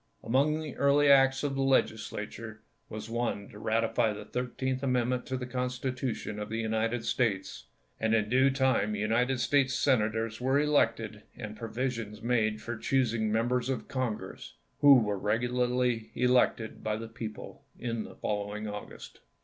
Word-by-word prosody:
Among 145 Hz, +6 st, +2 dB
the 155 Hz, -3 st, -6 dB
early 140 Hz, 0 st, +5 dB
acts 135 Hz, 0 st, +5 dB
of 145 Hz, -1 st, 0 dB
the 135 Hz, -, -1 dB
Legislature 110 Hz, -3 st, -1 dB, 0.3 s
was 110 Hz, 0 st, -6 dB
one 115 Hz, -3 st, -2 dB
to 105 Hz, -, -12 dB
ratify 115 Hz, +1 st, +1 dB
the -, -, -8 dB
Thir 125 Hz, 0 st, -3 dB
teenth 130 Hz, +1 st, -3 dB
Amendment 125 Hz, -1 st, 0 dB
to 130 Hz, -, -2 dB
the 125 Hz, -, -4 dB
Constitution 125 Hz, -3 st, -3 dB
of 105 Hz, -, -5 dB
the 110 Hz, -, -3 dB
United 115 Hz, +1 st, -1 dB
States; 105 Hz, -6 st, -1 dB, 0.3 s
and 110 Hz, 0 st, +2 dB
in 110 Hz, -2 st, +1 dB
due 130 Hz, +4 st, +4 dB
time 130 Hz, -6 st, +1 dB
United 115 Hz, +5 st, +1 dB
States 135 Hz, 0 st, +2 dB
Senators 115 Hz, -3 st, +1 dB
were 135 Hz, +2 st, +2 dB
elected, 115 Hz, -8 st, +1 dB, 0.2 s
and 110 Hz, -3 st, -6 dB
provisions 115 Hz, -2 st, -4 dB
made 110 Hz, -3 st, +1 dB
for 120 Hz, -, -4 dB
choosing 115 Hz, -4 st, +1 dB
Members 120 Hz, +3 st, +1 dB
of 130 Hz, -, -2 dB
Congress, 125 Hz, -5 st, -4 dB, 0.2 s
who 145 Hz, -1 st, +8 dB
were 105 Hz, -2 st, -2 dB
regularly 120 Hz, +1 st, 0 dB
elected 125 Hz, -2 st, +2 dB
by 105 Hz, 0 st, 0 dB
the 115 Hz, +1 st, -6 dB
people 115 Hz, -2 st, -8 dB
in 115 Hz, -2 st, -3 dB
the -, -, -11 dB
following 105 Hz, +1 st, -3 dB
August. 105 Hz, 0 st, -8 dB
120 Hz, 155 wpm, -30 LUFS, 110-130 Hz, 0.3 s, who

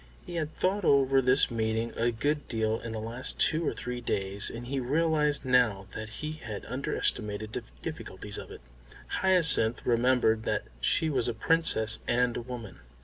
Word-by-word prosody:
He -, -, -9 dB
had 160 Hz, -2 st, -4 dB
thought 195 Hz, +2 st, 0 dB
over 135 Hz, -3 st, +3 dB
this 130 Hz, +1 st, +3 dB
meeting 110 Hz, 0 st, -2 dB
a 115 Hz, +1 st, +1 dB
good 145 Hz, +6 st, -2 dB
deal 110 Hz, -1 st, -1 dB
in 115 Hz, -, -7 dB
the 110 Hz, -, -4 dB
last 115 Hz, +3 st, -2 dB
two 160 Hz, +1 st, +3 dB
or -, -, +1 dB
three 125 Hz, 0 st, -6 dB
days, 100 Hz, -3 st, +2 dB
and 120 Hz, +1 st, -8 dB
he 135 Hz, +2 st, -3 dB
realised 150 Hz, +1 st, +1 dB
now 120 Hz, -7 st, +2 dB
that 110 Hz, 0 st, -7 dB
he 150 Hz, +7 st, -6 dB
had 120 Hz, -10 st, -8 dB
underestimated 110 Hz, -5 st, -2 dB
the -, -, -3 dB, 0.2 s
difficulties -, -, -7 dB
of -, -, -10 dB
it. -, -, -11 dB, 0.6 s
Hyacinth 160 Hz, -11 st, +4 dB
remembered 120 Hz, -2 st, +2 dB
that -, -, -1 dB, 0.2 s
she 155 Hz, -, +1 dB
was 125 Hz, -4 st, 0 dB
a 120 Hz, -, -2 dB
Princess 110 Hz, -5 st, +4 dB
and 125 Hz, 0 st, +1 dB
a -, -, -3 dB
woman. 120 Hz, -3 st, -9 dB
125 Hz, 175 wpm, -28 LUFS, 110-145 Hz, 0.6 s, Hyacinth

